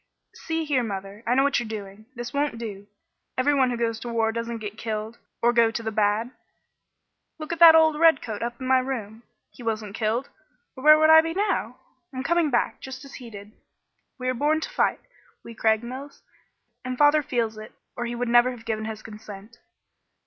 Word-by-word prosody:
"See 325 Hz, 0 st, -3 dB
here, 280 Hz, -4 st, +1 dB
mother! 200 Hz, -1 st, -6 dB
I 245 Hz, -, +2 dB
know 270 Hz, -, +4 dB
what 280 Hz, -2 st, +2 dB
you 240 Hz, -, -4 dB
are -, -, -10 dB
doing. 210 Hz, 0 st, -8 dB
This 240 Hz, 0 st, -6 dB
won't 285 Hz, -4 st, -1 dB
do. 205 Hz, -3 st, -7 dB, 0.5 s
Every 270 Hz, +3 st, +2 dB
one 265 Hz, -2 st, +3 dB
who 245 Hz, -, -2 dB
goes 230 Hz, -1 st, -1 dB
to 240 Hz, -, -6 dB
war 225 Hz, -1 st, +1 dB
doesn't 230 Hz, +1 st, -4 dB
get 210 Hz, -2 st, -7 dB
killed 220 Hz, 0 st, -5 dB, 0.2 s
or 240 Hz, 0 st, +4 dB
go 235 Hz, -1 st, +4 dB
to 225 Hz, +1 st, -5 dB
the 220 Hz, -, -2 dB
bad. 215 Hz, +3 st, +1 dB, 1.1 s
Look 310 Hz, +1 st, -5 dB
at 335 Hz, -, -6 dB
that 330 Hz, -1 st, +10 dB
old 320 Hz, -1 st, +5 dB
redcoat 270 Hz, -10 st, +3 dB
up 235 Hz, 0 st, -4 dB
in 260 Hz, -, -6 dB
my 260 Hz, 0 st, +4 dB
room. 230 Hz, -4 st, -5 dB, 0.3 s
He -, -, -15 dB
wasn't 220 Hz, -3 st, -3 dB
killed, 225 Hz, +4 st, -1 dB, 0.5 s
or 260 Hz, -, -10 dB
where 305 Hz, 0 st, +8 dB
would 315 Hz, 0 st, +5 dB
I 320 Hz, 0 st, +9 dB
be 330 Hz, +1 st, -4 dB
now? 380 Hz, -, -1 dB, 0.3 s
I'm 260 Hz, -1 st, -5 dB
coming 340 Hz, 0 st, +2 dB
back, 240 Hz, -3 st, 0 dB
just 265 Hz, +1 st, -8 dB
as 275 Hz, -, -13 dB
he 240 Hz, -, -9 dB
did. 205 Hz, -1 st, -11 dB, 0.7 s
We 255 Hz, -1 st, -5 dB
are 255 Hz, -, +1 dB
born 295 Hz, +5 st, +1 dB
to -, -, -5 dB
fight, -, -, 0 dB, 0.4 s
we 230 Hz, -, -10 dB
Craigmiles, 235 Hz, +6 st, -2 dB, 0.6 s
and 255 Hz, 0 st, -4 dB
father 295 Hz, +2 st, +5 dB
feels 235 Hz, -6 st, -2 dB
it 215 Hz, -, -11 dB, 0.2 s
or 240 Hz, -, -3 dB
he 240 Hz, -, -4 dB
never 240 Hz, 0 st, +3 dB
would 250 Hz, -, -6 dB
have 225 Hz, -, -16 dB
given 220 Hz, -1 st, -2 dB
his 220 Hz, -1 st, -6 dB
consent." 215 Hz, 0 st, -11 dB
240 Hz, 205 wpm, -25 LUFS, 220-275 Hz, 1.1 s, that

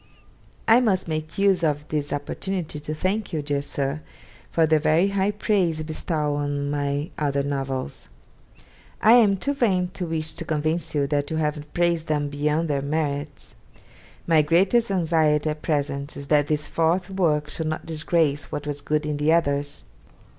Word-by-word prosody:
I 230 Hz, +2 st, +7 dB
must 195 Hz, -8 st, +1 dB
make 155 Hz, 0 st, -4 dB
use 195 Hz, -3 st, +3 dB
of 150 Hz, -1 st, 0 dB
this 150 Hz, -1 st, -2 dB
opportunity 155 Hz, +3 st, -3 dB
to 150 Hz, +1 st, -5 dB
thank 195 Hz, +7 st, -1 dB
you, 155 Hz, -3 st, -2 dB
dear 145 Hz, -1 st, -1 dB
Sir, 140 Hz, +1 st, -3 dB, 0.5 s
for 165 Hz, -, +3 dB
the 155 Hz, 0 st, +3 dB
very 160 Hz, +5 st, +3 dB
high 200 Hz, 0 st, +1 dB
praise 205 Hz, -5 st, +1 dB
you 155 Hz, -, -4 dB
bestow 155 Hz, -1 st, -1 dB
on 145 Hz, 0 st, -2 dB
my 145 Hz, +1 st, -2 dB
other 140 Hz, -2 st, 0 dB
novels. 135 Hz, -, -4 dB, 0.9 s
I 220 Hz, -, +5 dB
am 220 Hz, -5 st, +6 dB
too 280 Hz, +9 st, -1 dB
vain 190 Hz, -9 st, +1 dB
to 180 Hz, -3 st, -4 dB
wish 160 Hz, -1 st, -2 dB
to -, -, -7 dB
convince 155 Hz, +1 st, -2 dB
you 145 Hz, -1 st, +2 dB
that 145 Hz, 0 st, -1 dB
you 160 Hz, -, -2 dB
have 150 Hz, -1 st, -2 dB
praised 170 Hz, -2 st, +1 dB
them 150 Hz, -1 st, 0 dB
beyond 150 Hz, +3 st, 0 dB
their 140 Hz, -2 st, 0 dB
merits. 145 Hz, -1 st, -3 dB, 0.7 s
My 160 Hz, -2 st, +5 dB
greatest 190 Hz, +10 st, +3 dB
anxiety 160 Hz, -4 st, +2 dB
at 150 Hz, 0 st, -7 dB
present 140 Hz, -2 st, -2 dB
is 140 Hz, -, -7 dB
that 150 Hz, -1 st, +3 dB
this 150 Hz, 0 st, 0 dB
fourth 175 Hz, +3 st, 0 dB
work 155 Hz, -6 st, +1 dB
should 160 Hz, +1 st, -2 dB
not 155 Hz, 0 st, -3 dB
disgrace 155 Hz, -2 st, 0 dB
what 145 Hz, -, -4 dB
was 145 Hz, -1 st, -4 dB
good 150 Hz, +1 st, -1 dB
in 150 Hz, -1 st, -2 dB
the 150 Hz, +2 st, +2 dB
others. 145 Hz, -3 st, 0 dB
155 Hz, 175 wpm, -24 LUFS, 145-170 Hz, 0.9 s, I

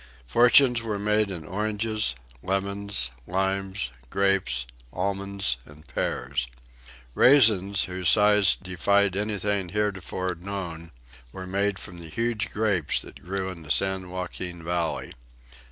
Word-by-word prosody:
Fortunes 120 Hz, -, +5 dB
were 110 Hz, -3 st, -3 dB
made 105 Hz, 0 st, +1 dB
in 85 Hz, -5 st, -6 dB
oranges, 105 Hz, -, -1 dB, 0.3 s
lemons, 100 Hz, -6 st, -2 dB, 0.2 s
limes, 95 Hz, -6 st, -1 dB, 0.2 s
grapes, 95 Hz, -11 st, +1 dB, 0.3 s
almonds 100 Hz, -6 st, -1 dB
and 75 Hz, +2 st, -16 dB
pears. 65 Hz, 0 st, -2 dB, 0.7 s
Raisins, 105 Hz, -, +5 dB
whose 90 Hz, -2 st, -1 dB
size 105 Hz, -2 st, +5 dB
defied 95 Hz, +2 st, +1 dB
anything 100 Hz, -2 st, -1 dB
heretofore 95 Hz, -2 st, -2 dB
known, 85 Hz, -2 st, -6 dB, 0.4 s
were 95 Hz, +6 st, -7 dB
made 100 Hz, +1 st, 0 dB
from 90 Hz, -2 st, -8 dB
the 85 Hz, -1 st, -9 dB
huge 115 Hz, +3 st, -1 dB
grapes 105 Hz, -8 st, +1 dB
that -, -, -13 dB
grew 95 Hz, +1 st, -3 dB
in 90 Hz, -3 st, -8 dB
the 75 Hz, -, -12 dB
San 95 Hz, +1 st, +1 dB
Joaquin 90 Hz, -1 st, -6 dB
Valley. 85 Hz, -1 st, -2 dB
95 Hz, 120 wpm, -26 LUFS, 90-105 Hz, 0.7 s, Fortunes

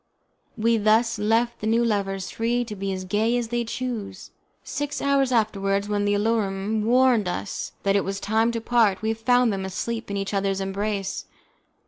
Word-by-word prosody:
We 230 Hz, +1 st, +2 dB
thus 220 Hz, +2 st, +2 dB
left 225 Hz, +3 st, +1 dB
the 215 Hz, -, -2 dB
new 230 Hz, +2 st, +3 dB
lovers 195 Hz, -3 st, -1 dB
free 240 Hz, +2 st, 0 dB
to 215 Hz, -2 st, -7 dB
be 195 Hz, 0 st, -3 dB
as 185 Hz, -1 st, -4 dB
gay 220 Hz, +5 st, +1 dB
as 235 Hz, -2 st, -2 dB
they 240 Hz, 0 st, 0 dB
chose. 230 Hz, -5 st, -5 dB, 0.3 s
Six 290 Hz, 0 st, -3 dB
hours 275 Hz, -2 st, +2 dB
afterwards, 200 Hz, -3 st, +1 dB
when 205 Hz, -1 st, 0 dB
the 205 Hz, 0 st, +2 dB
alarum 210 Hz, -1 st, 0 dB
warned 245 Hz, -3 st, +4 dB
us 180 Hz, +3 st, -4 dB
that 200 Hz, 0 st, +2 dB
it 200 Hz, -, +3 dB
was 195 Hz, 0 st, -3 dB
time 220 Hz, +3 st, +1 dB
to 230 Hz, -, -2 dB
part, 220 Hz, -4 st, +2 dB
we 220 Hz, 0 st, +1 dB
found 245 Hz, 0 st, +2 dB
them 190 Hz, -1 st, -3 dB
asleep 225 Hz, +5 st, -4 dB
in 200 Hz, -, -2 dB
each 195 Hz, +1 st, -3 dB
other's 195 Hz, -1 st, 0 dB
embrace. 195 Hz, 0 st, -3 dB
215 Hz, 180 wpm, -24 LUFS, 195-235 Hz, 0.3 s, warned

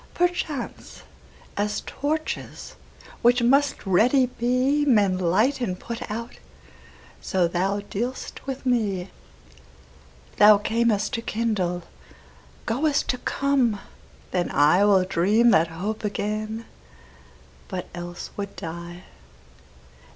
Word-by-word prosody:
Perchance, 345 Hz, -7 st, -2 dB, 0.5 s
as 210 Hz, +1 st, -1 dB
torches, 310 Hz, +2 st, -4 dB, 0.5 s
which 240 Hz, +1 st, +4 dB
must 275 Hz, +2 st, +2 dB
ready 240 Hz, +8 st, +4 dB
be, 255 Hz, +4 st, +1 dB
Men 210 Hz, -9 st, +3 dB
light 215 Hz, +10 st, +2 dB
and 185 Hz, -6 st, -2 dB
put 235 Hz, -1 st, -6 dB
out, 230 Hz, +3 st, -6 dB, 0.8 s
so 180 Hz, -2 st, +1 dB
thou 190 Hz, +4 st, -1 dB
dealst 240 Hz, +7 st, -5 dB
with 270 Hz, 0 st, -5 dB
me. 200 Hz, -7 st, 0 dB, 1.3 s
Thou 210 Hz, 0 st, +8 dB
cam'st 220 Hz, 0 st, 0 dB
to 230 Hz, -, -1 dB
kindle, 210 Hz, -7 st, -1 dB, 0.8 s
goest 280 Hz, +5 st, 0 dB
to 250 Hz, -, 0 dB
come: 260 Hz, -8 st, +1 dB, 0.5 s
then 180 Hz, -1 st, 0 dB
IWill 185 Hz, +6 st, +4 dB
dream 210 Hz, +7 st, +3 dB
that 165 Hz, -2 st, +4 dB
hope 195 Hz, +8 st, -4 dB
again, 215 Hz, +2 st, -3 dB, 1.0 s
but 185 Hz, -2 st, -4 dB
else 175 Hz, 0 st, -7 dB
would 200 Hz, -1 st, -5 dB
die. 170 Hz, +2 st, -7 dB
215 Hz, 100 wpm, -24 LUFS, 185-245 Hz, 1.3 s, Thou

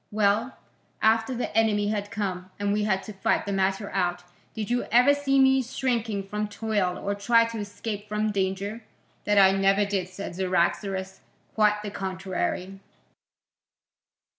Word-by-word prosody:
"Well, 215 Hz, +4 st, +1 dB, 0.4 s
after 225 Hz, +3 st, +2 dB
the 245 Hz, -, -4 dB
enemy 210 Hz, -2 st, +2 dB
had 205 Hz, -1 st, -2 dB
come, 190 Hz, -4 st, -4 dB
and 205 Hz, 0 st, 0 dB
we 210 Hz, 0 st, 0 dB
had 190 Hz, -2 st, 0 dB
to 215 Hz, -, -8 dB
fight 195 Hz, -, 0 dB
the 200 Hz, -, -3 dB
matter 195 Hz, +1 st, 0 dB
out, 180 Hz, -2 st, -1 dB, 0.3 s
did 220 Hz, +1 st, -4 dB
you 245 Hz, -, +1 dB
ever 250 Hz, +5 st, +5 dB
see 280 Hz, -1 st, +1 dB
me 265 Hz, 0 st, +5 dB
shrink 230 Hz, -5 st, -2 dB
from 210 Hz, +1 st, -2 dB
toil 205 Hz, -4 st, -1 dB
or 200 Hz, -, -2 dB
try 230 Hz, +3 st, +3 dB
to 230 Hz, -1 st, -5 dB
escape 205 Hz, 0 st, -5 dB
from 210 Hz, 0 st, 0 dB
danger?" 200 Hz, +3 st, -2 dB, 0.4 s
"That 205 Hz, 0 st, +2 dB
I 190 Hz, -1 st, +7 dB
never 195 Hz, +1 st, +3 dB
did," 195 Hz, -3 st, -2 dB
said 185 Hz, -1 st, -7 dB
Cyaxares, 190 Hz, +1 st, -1 dB, 0.3 s
"quite 210 Hz, -1 st, +2 dB
the 205 Hz, -, -5 dB
contrary." 190 Hz, 0 st, -3 dB
205 Hz, 155 wpm, -26 LUFS, 195-220 Hz, 0.4 s, I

